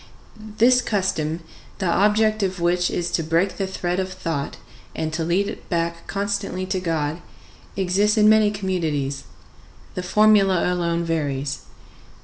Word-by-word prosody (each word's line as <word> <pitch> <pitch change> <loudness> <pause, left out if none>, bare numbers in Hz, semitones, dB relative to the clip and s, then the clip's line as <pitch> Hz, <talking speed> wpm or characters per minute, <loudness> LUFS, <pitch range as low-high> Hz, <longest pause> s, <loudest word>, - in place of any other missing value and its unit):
This 250 +2 +5
custom, 175 -7 -1 0.4
the 195 - -3
object 210 +4 +3
of 190 -2 -1
which 175 +1 +1
is 175 0 -2
to - - +1
break 165 +4 0
the 195 - -1
thread 180 -1 -2
of 190 0 -2
thought 165 -6 -4 0.4
and 155 0 -3
to 165 +1 -1
lead 180 +5 +1
it - - -8
back 170 -1 -2
constantly 200 -2 -2
to 185 0 -2
God, 165 -2 -2 0.6
exists 200 +3 +2
in 210 0 +5
many 215 -1 +5
communities; 160 -9 -2 0.7
the 180 - -3
formula 195 -2 +4
alone 170 -1 0
varies. 145 -4 -2
180 Hz, 140 wpm, -22 LUFS, 165-200 Hz, 0.7 s, This